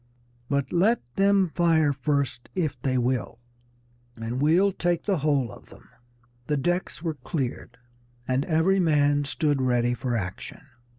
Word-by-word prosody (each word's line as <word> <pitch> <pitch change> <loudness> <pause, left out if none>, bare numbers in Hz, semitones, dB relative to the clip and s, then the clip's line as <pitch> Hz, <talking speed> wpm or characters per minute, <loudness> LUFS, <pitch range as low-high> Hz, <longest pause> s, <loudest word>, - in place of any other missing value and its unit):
But 140 -1 -1
let 210 +7 +3 0.2
them 195 -2 +3
fire 160 -4 +3
first 140 -2 -2
if 155 -8 -2
they 130 -2 0
will, 125 -2 -1 0.8
and 115 +3 -4
we'll 175 +7 +4
take 175 -2 -1
the 195 -5 0
whole 140 -5 +1
of - - -14
them!" - - -17 0.6
The 150 - 0
decks 175 +3 -2
were 165 -2 -1
cleared, 125 -3 -5 0.5
and 130 +2 +1
every 175 +4 +2
man 145 -4 +2
stood 145 -1 0
ready 125 -1 +1
for 125 0 -2
action. 95 -4 -6
145 Hz, 140 wpm, -26 LUFS, 130-170 Hz, 0.8 s, we'll